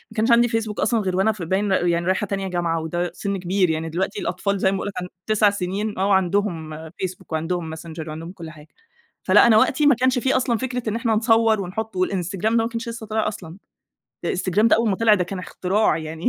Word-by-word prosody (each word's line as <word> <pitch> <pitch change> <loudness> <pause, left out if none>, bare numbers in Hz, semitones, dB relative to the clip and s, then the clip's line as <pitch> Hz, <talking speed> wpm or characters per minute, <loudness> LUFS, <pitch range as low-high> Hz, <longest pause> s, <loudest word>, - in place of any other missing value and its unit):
كانش 225 +2 +2
عندي 235 +1 +5
Facebook 225 -2 -2
أصلًا 235 -3 +2
غير 190 -3 -1
وأنا 195 +4 +3
ف 215 -3 -9
باين 190 +4 0
يعني 175 -2 +1
رايحة 190 +3 0
تانية 195 0 -3
جامعة، 170 -3 -1
وده 175 +2 -2
سن 200 -1 -3
كبير 185 0 +1
يعني، 160 0 -2
دلوقتي 190 +5 -2
الأطفال 200 +3 -1
زي 190 0 +2
ما - - -1
باقول - - -4
لك 205 - -5
عنده 180 - -7 0.2
9 215 -1 +4
سنين 200 +1 -3
وعندهم 190 -4 0
Facebook 185 +2 -6
وعندهم 160 0 -2
Messenger 160 0 -8
وعندهم 160 +3 -7
كل 170 -4 -9
حاجة. 155 -1 -14 0.6
فلأ - - +6
أنا 220 -2 +6
وقتي 265 +6 +3
ما 285 -4 +6
كانش 255 +1 +2
في 265 +2 +1
أصلًا 245 -2 +1
فكرة 250 -2 -3
إن 215 - -2
إحنا 230 -2 0
نصور 225 -1 +3
ونحط 200 +2 -5
والInstagram 185 0 -2
ده 220 - +4
ما 230 0 +2
كانش 235 +1 -5
لسه 230 -1 -7
طلع 220 0 -1
أصلًا. 185 -5 -7 0.7
الInstagram 185 +2 0
ده - - +5
أول 230 -1 +1
ما 195 - 0
طلع 225 0 +5
كان 185 0 -2
اختراع 185 +1 0
يعني 160 +2 -6
195 Hz, 215 wpm, -22 LUFS, 175-220 Hz, 0.7 s, فلأ